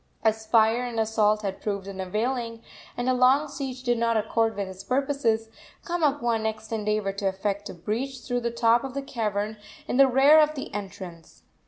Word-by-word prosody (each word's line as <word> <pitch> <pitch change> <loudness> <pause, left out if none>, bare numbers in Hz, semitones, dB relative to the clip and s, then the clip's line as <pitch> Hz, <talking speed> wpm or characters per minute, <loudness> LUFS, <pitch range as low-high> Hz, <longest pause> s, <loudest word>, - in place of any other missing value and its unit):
As 220 0 +1
fire 225 +1 +4
and 240 -2 -3
assault 215 -1 +2
had 195 -1 -4
proved 200 -2 -3
unavailing, 225 +5 -3 0.3
and 245 +1 -2
a 255 - +3
long 260 +4 +4
siege 270 -3 -6
did 240 -2 +1
not 230 -1 +2
accord 225 +1 +1
with 200 -1 -3
his 190 0 -9
purposes, 255 -5 0 0.4
Kamapuaa 285 -9 +1
next 220 0 -4
endeavored 210 -2 -1
to 200 - 0
effect 200 +1 -2
a - - -8
breach 240 +9 -3
through 245 -1 -2
the 235 0 -1
top 235 0 +3
of 270 -1 -6
the 275 - -2
cavern 215 -4 -2 0.3
in - - -1
the 275 0 +7
rear 275 +4 +6
of 305 0 +3
the 270 - -6
entrance. 190 -5 -8
225 Hz, 185 wpm, -26 LUFS, 210-255 Hz, 0.4 s, the